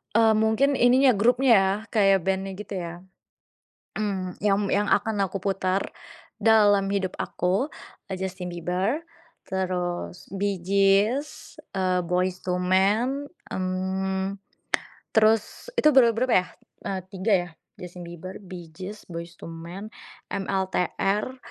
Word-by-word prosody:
Eee, 225 Hz, -1 st, +6 dB
mungkin 220 Hz, +6 st, +2 dB
ininya 255 Hz, +2 st, +6 dB
grupnya 245 Hz, +4 st, +3 dB
ya, 190 Hz, 0 st, +2 dB, 0.2 s
kayak 195 Hz, -4 st, +4 dB
band-nya 190 Hz, 0 st, -1 dB
gitu 210 Hz, +1 st, -9 dB
ya. 175 Hz, +1 st, -7 dB, 0.9 s
Mhm, 190 Hz, -4 st, -2 dB
yang 200 Hz, -1 st, +4 dB
yang 205 Hz, +1 st, +1 dB
akan 215 Hz, +1 st, +1 dB
aku 190 Hz, 0 st, -4 dB
putar 190 Hz, 0 st, 0 dB, 0.6 s
dalam 205 Hz, -3 st, +5 dB
hidup 190 Hz, -2 st, -1 dB
aku, 195 Hz, -, -1 dB, 0.3 s
e -, -, -8 dB
Justin 185 Hz, -2 st, -4 dB
Bieber, 180 Hz, -, -1 dB, 0.5 s
terus 180 Hz, -2 st, -3 dB
Bee 195 Hz, -1 st, -2 dB
Gees, 200 Hz, -, +1 dB, 0.2 s
eee, 185 Hz, -2 st, 0 dB
Boyz 180 Hz, +1 st, -1 dB
II 180 Hz, 0 st, -1 dB
Man, 215 Hz, -, +1 dB, 0.2 s
mmm, 190 Hz, +1 st, -2 dB, 0.8 s
terus 220 Hz, -, +2 dB
itu 305 Hz, -9 st, +5 dB
ber 255 Hz, -3 st, +7 dB
berapa 250 Hz, 0 st, +2 dB
ya? 180 Hz, -, -8 dB, 0.4 s
E -, -, -1 dB, 0.2 s
3 195 Hz, +3 st, 0 dB
ya, 175 Hz, 0 st, -2 dB, 0.3 s
Justin 180 Hz, 0 st, -9 dB
Bieber, 185 Hz, +4 st, -8 dB
Bee 175 Hz, -4 st, -10 dB
Gees, 190 Hz, +5 st, -8 dB
Boyz 170 Hz, 0 st, -8 dB
II 165 Hz, -, -7 dB
Man, 175 Hz, +6 st, -8 dB, 0.4 s
MLTR, 195 Hz, +4 st, -1 dB
195 Hz, 125 wpm, -25 LUFS, 185-215 Hz, 0.9 s, ber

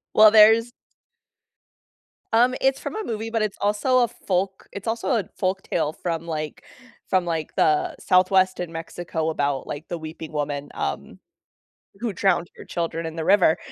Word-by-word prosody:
Well, 215 Hz, 0 st, +8 dB
there's 225 Hz, +2 st, +6 dB, 1.6 s
Um, 245 Hz, +3 st, +4 dB
it's 270 Hz, 0 st, +2 dB
from -, -, -6 dB
a 435 Hz, -, -3 dB
movie, 225 Hz, -, -4 dB
but 225 Hz, -1 st, -1 dB
it's 215 Hz, -2 st, -2 dB
also 210 Hz, +6 st, +2 dB
a -, -, +2 dB
folk 190 Hz, -2 st, -3 dB
it's 200 Hz, -, -8 dB
also 225 Hz, +1 st, -2 dB
a 200 Hz, -, -4 dB
folk 190 Hz, 0 st, -1 dB
tale 155 Hz, -2 st, -1 dB
from 165 Hz, -1 st, -4 dB
like 155 Hz, -2 st, -4 dB, 0.5 s
from 185 Hz, -2 st, +2 dB
like 165 Hz, -2 st, -3 dB
the 155 Hz, -1 st, +2 dB
southwest 185 Hz, 0 st, +3 dB
in 175 Hz, -2 st, -4 dB
Mexico 165 Hz, 0 st, -4 dB
about 145 Hz, -3 st, -1 dB
like 145 Hz, +3 st, -6 dB
the 175 Hz, -, -4 dB
weeping 160 Hz, 0 st, -8 dB
woman, 145 Hz, -1 st, -3 dB
um, 70 Hz, -, -4 dB, 0.8 s
who 230 Hz, -2 st, -2 dB
drowned 180 Hz, -2 st, +1 dB
her -, -, -11 dB
children 165 Hz, -1 st, -3 dB
in 160 Hz, 0 st, -5 dB
the 160 Hz, -1 st, -3 dB
river, 185 Hz, -5 st, +5 dB
180 Hz, 165 wpm, -24 LUFS, 160-215 Hz, 1.6 s, Well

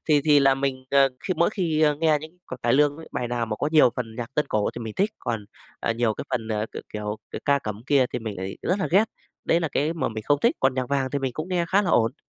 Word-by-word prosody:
thì 150 Hz, -2 st, +5 dB
thì 150 Hz, -2 st, +6 dB
là 135 Hz, -1 st, +5 dB
mình, 135 Hz, -1 st, -2 dB
à, 140 Hz, -1 st, +5 dB
khi 190 Hz, -2 st, -2 dB
mỗi 170 Hz, +3 st, +2 dB
khi, 170 Hz, -7 st, -1 dB
ơ, 150 Hz, -1 st, +4 dB
nghe 155 Hz, -2 st, +4 dB
những 160 Hz, +3 st, -11 dB
c 130 Hz, -, -8 dB
cải 120 Hz, -, +2 dB
lương 145 Hz, +1 st, +3 dB
ấy, 160 Hz, 0 st, -11 dB
bài 120 Hz, -, -2 dB
nào 120 Hz, -1 st, -1 dB
mà 110 Hz, -1 st, -3 dB
có 145 Hz, -, -1 dB
nhiều 150 Hz, -6 st, +6 dB
phần 115 Hz, -3 st, -5 dB
nhạc 120 Hz, +2 st, -6 dB
tân 150 Hz, -, +1 dB
cổ 105 Hz, -1 st, +1 dB
thì -, -, -5 dB
mình 110 Hz, -, -6 dB
thích, 200 Hz, +3 st, +2 dB
còn, 115 Hz, -4 st, -3 dB, 0.4 s
à, 115 Hz, -, 0 dB
nhiều 115 Hz, -1 st, 0 dB
cái -, -, -6 dB
phần, 115 Hz, -4 st, -2 dB
à, 110 Hz, -1 st, -1 dB
c -, -, -38 dB, 0.2 s
kiểu, 105 Hz, 0 st, -3 dB, 0.2 s
c -, -, -6 dB
ca 140 Hz, 0 st, +3 dB
cẩm 105 Hz, -5 st, -6 dB
kia 140 Hz, -2 st, +4 dB
thì -, -, -1 dB
mình 110 Hz, -3 st, -5 dB
lại 95 Hz, +1 st, -5 dB
rất 185 Hz, +3 st, 0 dB
là 190 Hz, -, 0 dB
ghét, 195 Hz, +5 st, +5 dB, 0.4 s
đấy 165 Hz, -, +3 dB
là 165 Hz, -, -1 dB
cái 155 Hz, +3 st, +1 dB
mà 170 Hz, -, -1 dB
mình 110 Hz, -1 st, -6 dB
không 145 Hz, +3 st, +3 dB
thích, -, -, +3 dB
còn 135 Hz, -1 st, +3 dB
nhạc 130 Hz, -1 st, -2 dB
vàng 135 Hz, -2 st, 0 dB
thì 140 Hz, -, -1 dB
mình 135 Hz, -2 st, -2 dB
cũng 155 Hz, +7 st, -5 dB
nghe 180 Hz, -2 st, +1 dB
khá 200 Hz, +3 st, +3 dB
là 180 Hz, -, 0 dB
ổn. 115 Hz, +3 st, 0 dB
135 Hz, 300 wpm, -25 LUFS, 115-155 Hz, 0.4 s, thì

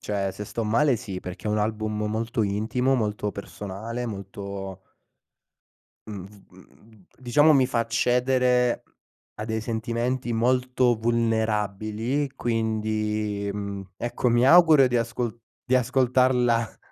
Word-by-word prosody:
cioè 100 Hz, -2 st, -2 dB
se 105 Hz, -, -7 dB
sto 115 Hz, +2 st, -4 dB
male 125 Hz, +5 st, +3 dB
sì, 100 Hz, -4 st, -6 dB
perché 90 Hz, +3 st, -8 dB
è -, -, 0 dB
un 105 Hz, 0 st, +1 dB
album 105 Hz, 0 st, -2 dB
molto 115 Hz, +1 st, -1 dB
intimo, 110 Hz, +6 st, 0 dB
molto 105 Hz, -3 st, -1 dB
personale, 105 Hz, +4 st, -6 dB
molto 100 Hz, -2 st, -6 dB, 1.3 s
Mhmm, 100 Hz, -4 st, -7 dB
v 105 Hz, +1 st, -17 dB, 0.2 s
mhmm, 110 Hz, -4 st, -22 dB
diciamo 145 Hz, +5 st, +4 dB
mi 130 Hz, -2 st, +4 dB
fa 125 Hz, -2 st, -1 dB
accedere 125 Hz, +1 st, +2 dB, 0.5 s
a 105 Hz, -, -5 dB
dei 110 Hz, -1 st, -2 dB
sentimenti 120 Hz, +2 st, -2 dB
molto 125 Hz, +1 st, +2 dB
vulnerabili, 110 Hz, +2 st, -1 dB
quindi, 110 Hz, -2 st, -1 dB
mhmm, 100 Hz, -2 st, -6 dB
ecco 120 Hz, +2 st, -1 dB
mi 120 Hz, +1 st, +3 dB
auguro 160 Hz, -3 st, +7 dB
di 125 Hz, -1 st, 0 dB
ascol 115 Hz, 0 st, -2 dB, 0.3 s
di 130 Hz, -, +2 dB
ascoltarla 125 Hz, -2 st, +2 dB
115 Hz, 125 wpm, -25 LUFS, 105-125 Hz, 1.3 s, auguro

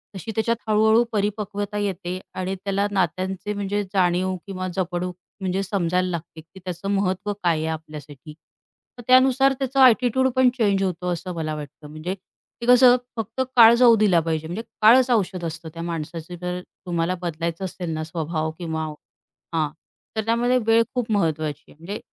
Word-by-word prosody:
तशी 195 Hz, +4 st, -6 dB
त्याच्यात 230 Hz, +1 st, +1 dB
हळू-हळू 220 Hz, +2 st, +4 dB
परिपक्वता 205 Hz, 0 st, -2 dB
येते 185 Hz, -3 st, -3 dB, 0.2 s
आणि 185 Hz, +1 st, -2 dB
त्याला 200 Hz, +1 st, -1 dB
नात्यांची 190 Hz, +2 st, -1 dB
म्हणजे 205 Hz, 0 st, -2 dB
जाणीव 185 Hz, 0 st, +2 dB
किंवा 185 Hz, -1 st, -4 dB
जपणूक 180 Hz, -1 st, -2 dB, 0.3 s
म्हणजे 190 Hz, +1 st, -1 dB
समजायला 185 Hz, -2 st, 0 dB
लागते, 165 Hz, -1 st, -6 dB
की 165 Hz, +4 st, -16 dB
त्याचं 180 Hz, +2 st, -4 dB
महत्व 200 Hz, +1 st, 0 dB
काय 175 Hz, -5 st, 0 dB
आहे 155 Hz, +1 st, -2 dB
आपल्यासाठी. 150 Hz, -2 st, -10 dB, 0.6 s
तर -, -, -8 dB
त्यानुसार 265 Hz, +1 st, +5 dB
त्याचा 270 Hz, 0 st, -1 dB
ॲटिट्यूडपण 255 Hz, +1 st, +4 dB
चेंज 200 Hz, -4 st, +2 dB
होतो 180 Hz, -1 st, -2 dB
असं 180 Hz, +2 st, -5 dB
मला 155 Hz, -1 st, -3 dB
वाटतं. 150 Hz, 0 st, -9 dB
म्हणजे 155 Hz, +4 st, -4 dB
की 200 Hz, +4 st, -14 dB
कसं 250 Hz, 0 st, +7 dB, 0.2 s
फक्त 225 Hz, +3 st, -3 dB
काळ 230 Hz, -1 st, +9 dB
जाऊ 235 Hz, -1 st, +6 dB
दिला 200 Hz, -5 st, +4 dB
पाहिजे 160 Hz, -1 st, -2 dB
म्हणजे 185 Hz, +7 st, -4 dB, 0.2 s
काळच 250 Hz, +4 st, +6 dB
औषध 190 Hz, -5 st, 0 dB
असतं 165 Hz, 0 st, -6 dB
त्या 165 Hz, -, -7 dB
माणसाचं 165 Hz, +1 st, -5 dB
जर 180 Hz, 0 st, -3 dB, 0.3 s
तुम्हाला 170 Hz, 0 st, -1 dB
बदलायचं 170 Hz, +1 st, -3 dB
असेल 180 Hz, -1 st, -5 dB
ना 155 Hz, 0 st, -3 dB
स्वभाव 160 Hz, 0 st, -3 dB
किंवा 160 Hz, -2 st, -3 dB, 0.7 s
हां, 155 Hz, -2 st, +1 dB, 0.5 s
तर 220 Hz, -1 st, -1 dB
त्यामध्ये 240 Hz, +2 st, +2 dB
वेळ 225 Hz, 0 st, +5 dB
खूप 245 Hz, -3 st, -1 dB
महत्त्वाची 155 Hz, -6 st, 0 dB
आहे, -, -, -18 dB
म्हणजे 195 Hz, +6 st, -6 dB
185 Hz, 160 wpm, -23 LUFS, 165-215 Hz, 0.7 s, काळ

